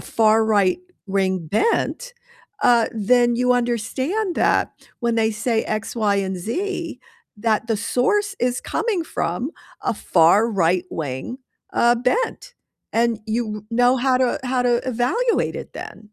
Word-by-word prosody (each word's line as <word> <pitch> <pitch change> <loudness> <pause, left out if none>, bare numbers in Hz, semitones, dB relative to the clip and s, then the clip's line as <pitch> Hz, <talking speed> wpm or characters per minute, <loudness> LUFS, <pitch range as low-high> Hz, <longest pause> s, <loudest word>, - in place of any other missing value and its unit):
far 220 0 +3
right-wing 200 - 0 0.2
bent, - - 0 0.5
uh, 235 -2 +5 0.3
then 240 -1 +4
you 250 +1 +2
understand 260 - -1
that - - +3 0.4
when 235 -2 0
they 220 0 +2
say 220 +1 -1
X, 215 +2 -4
Y, 210 -3 +2
and 190 0 -3
Z, 330 - -4 0.4
that 220 +1 0
the 225 - +1
source 390 - 0
is 245 - -3
coming 405 -8 0
from 240 - -3 0.3
a - - 0
far 170 +1 +4 0.2
right-wing, 165 - -2 0.3
uh, 240 +1 +3
bent, 470 - -1 0.4
and 230 -1 +1
you 225 +2 0
w - - -4 0.3
know 245 +1 +5
how 260 -1 +4
to 250 - +3 0.2
how 255 -1 +1
to 240 - +3 0.2
evaluate 420 - 0
it - - -27
then. - - -10
235 Hz, 140 wpm, -21 LUFS, 215-265 Hz, 0.5 s, uh